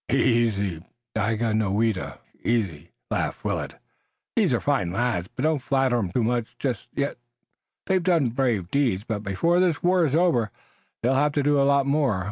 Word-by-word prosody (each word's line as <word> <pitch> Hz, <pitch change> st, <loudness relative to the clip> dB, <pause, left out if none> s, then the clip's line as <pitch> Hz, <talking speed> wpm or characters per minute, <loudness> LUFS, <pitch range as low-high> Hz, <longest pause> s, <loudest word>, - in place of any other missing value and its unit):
"Easy, 110 Hz, -9 st, +1 dB, 0.3 s
Daganoweda, 110 Hz, -1 st, 0 dB, 0.3 s
easy!" 90 Hz, -9 st, -1 dB, 0.2 s
laughed -, -, -2 dB
Willet. -, -, -2 dB, 0.6 s
"These -, -, +3 dB
are -, -, +2 dB
fine 85 Hz, -2 st, 0 dB
lads, 95 Hz, -4 st, -1 dB
but 130 Hz, -, -3 dB
don't 155 Hz, -3 st, +1 dB
flatter 130 Hz, -2 st, +1 dB
'em 95 Hz, -5 st, -2 dB
too 120 Hz, -, +1 dB
much 120 Hz, 0 st, -1 dB
just 125 Hz, -6 st, -3 dB
yet. 140 Hz, 0 st, -1 dB, 0.7 s
They've 190 Hz, -1 st, +2 dB
done 170 Hz, -7 st, +2 dB
brave 115 Hz, -7 st, -1 dB
deeds, 125 Hz, -9 st, +1 dB
but 110 Hz, -2 st, -3 dB
before 110 Hz, -, +1 dB
this 175 Hz, -5 st, +1 dB
war 180 Hz, -2 st, +3 dB
is 140 Hz, -, -1 dB
over 160 Hz, -, +2 dB, 0.5 s
they'll 125 Hz, +3 st, +3 dB
have 145 Hz, +2 st, +2 dB
to 145 Hz, -, +1 dB
do 145 Hz, 0 st, +3 dB
a 140 Hz, -, +3 dB
lot 140 Hz, -1 st, +3 dB
more. 140 Hz, -8 st, +1 dB
120 Hz, 165 wpm, -25 LUFS, 105-145 Hz, 0.7 s, These